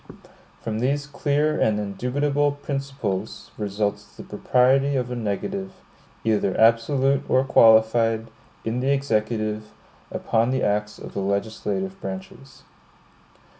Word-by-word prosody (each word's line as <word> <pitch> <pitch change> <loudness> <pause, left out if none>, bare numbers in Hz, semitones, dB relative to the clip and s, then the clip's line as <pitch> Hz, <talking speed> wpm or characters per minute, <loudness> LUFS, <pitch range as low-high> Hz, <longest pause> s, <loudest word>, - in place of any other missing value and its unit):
From 110 -1 -3
these 140 +4 0
clear 145 +1 0
and 110 -1 +2
indubitable 140 +8 0
principles 135 -8 -4
results 105 0 -2
the - - -8
propriety 130 +6 +2
of 125 -1 -1
a - - -2
negative, 190 - -3 0.5
either 105 -4 +1
absolute 130 +5 +3
or 130 - +4
qualified, 115 -2 +4 0.4
in 115 +2 -1
the 130 +2 0
Executive, 110 -5 -1 0.4
upon 115 +2 0
the 130 0 0
acts 105 +1 0
of - - -10
the - - -3
legislative 110 - -2
branches. 190 -8 -8
125 Hz, 115 wpm, -24 LUFS, 110-140 Hz, 0.5 s, or